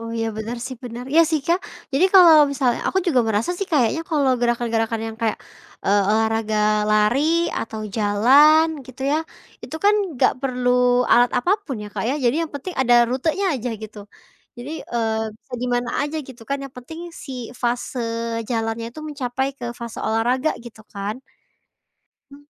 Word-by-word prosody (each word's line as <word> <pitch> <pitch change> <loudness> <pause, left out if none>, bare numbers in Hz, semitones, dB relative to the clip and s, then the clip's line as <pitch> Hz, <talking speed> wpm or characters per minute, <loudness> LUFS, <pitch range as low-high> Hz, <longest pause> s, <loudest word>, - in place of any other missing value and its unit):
Oh, 230 0 -6
iya, 225 0 -1
benar, 225 +2 -4
sih, 260 - -7
benar, 240 +1 -7
iya, 330 +2 +7
sih, 315 -2 +1
Kak, 345 +3 +2 0.3
jadi 280 +7 +3
kalau 345 -4 +9 0.2
misalnya 255 -4 0
aku 380 - +1
juga 265 -8 +3
merasa 215 +9 0
sih 395 - -2
kayaknya 280 +1 +2
kalau 290 -5 +2
gerakan-gerakan 230 -2 0
yang 220 - -13
kayak, 220 -2 0 0.5
eee, 200 +1 +3
olahraga 220 0 +1 0.3
lari 215 +5 +3 0.4
atau 220 -1 -6 0.2
jalan 270 +10 +5 0.2
gitu 255 +1 -10
ya, 305 - +2 0.5
itu - - -7
kan 415 - +6 0.3
gak - - +5
perlu 250 -1 +2
alat 240 0 +5
apa 350 - -1 0.2
pun 265 - -4
ya, - - -7
Kak, - - -2
ya. 265 - 0
Jadi 240 +3 +3
yang 320 - -10
penting 340 +6 -6
ada 245 -2 +4
rutenya 305 +10 -1
aja 250 -1 -3
gitu. 215 -1 -9 0.6
Jadi, 250 +5 -7
eee, 225 -2 -1 0.2
bisa 250 - -27
di 250 - -1
mana 245 0 -1
aja 295 +2 -3
gitu 245 -3 -12
kan 280 - -1
yang 275 - -10
penting 320 +7 -9
si 275 - -9 0.3
fase 245 +1 -1 0.5
jalannya 225 0 -2
tuh 310 - -8
mencapai 265 -3 -2
ke 245 - -7
fase 235 -1 -7
olahraga 245 +6 +1
gitu 230 -2 -12
kan. 205 +5 -5 1.1
Mmm. 285 +1 -15
245 Hz, 175 wpm, -21 LUFS, 225-280 Hz, 1.1 s, kalau